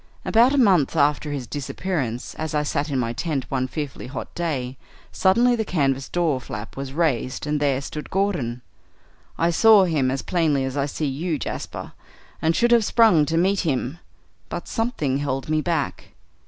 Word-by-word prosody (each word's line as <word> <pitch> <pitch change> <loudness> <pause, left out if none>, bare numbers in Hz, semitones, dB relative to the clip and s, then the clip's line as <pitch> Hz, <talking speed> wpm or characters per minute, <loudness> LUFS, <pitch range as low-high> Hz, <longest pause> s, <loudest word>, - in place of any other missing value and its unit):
About 235 +4 +5
a 285 - +1
month 185 - +4
after 150 0 +2
his 140 -3 -4
disappearance, 140 -3 -3
as 155 -1 -4
I 150 - +2
sat 145 0 -1
in 140 - -1
my 115 -2 -1
tent 145 -2 -2
one 130 -1 0
fearfully 145 -2 -5
hot 130 - -7
day, 135 -7 -3 0.4
suddenly 235 +6 +3
the 225 - -1
canvas 135 -8 0
door 160 -7 0
flap 105 -2 -7
was 135 -1 -5
raised 140 -5 -1
and 150 0 0
there 140 -2 +1
stood 150 +2 -7
Gordon. 145 -12 -1 0.7
I 170 +1 +2
saw 215 +3 +6
him 155 -7 +1
as 135 +1 -2
plainly 155 -7 +1
as 130 0 -4
I 140 0 0
see 150 +2 -3
you, 155 +4 -2
Jasper, - - -6 0.5
and 160 +1 +2
should 240 0 +3
have 235 -2 +5
sprung 210 -10 +4
to 165 - 0
meet 190 +3 +2
him, 140 -1 -1 0.5
but - - -5
something 155 - -1
held 135 -1 -3
me 155 0 +2
back. 165 -3 -2
150 Hz, 180 wpm, -23 LUFS, 135-175 Hz, 0.7 s, saw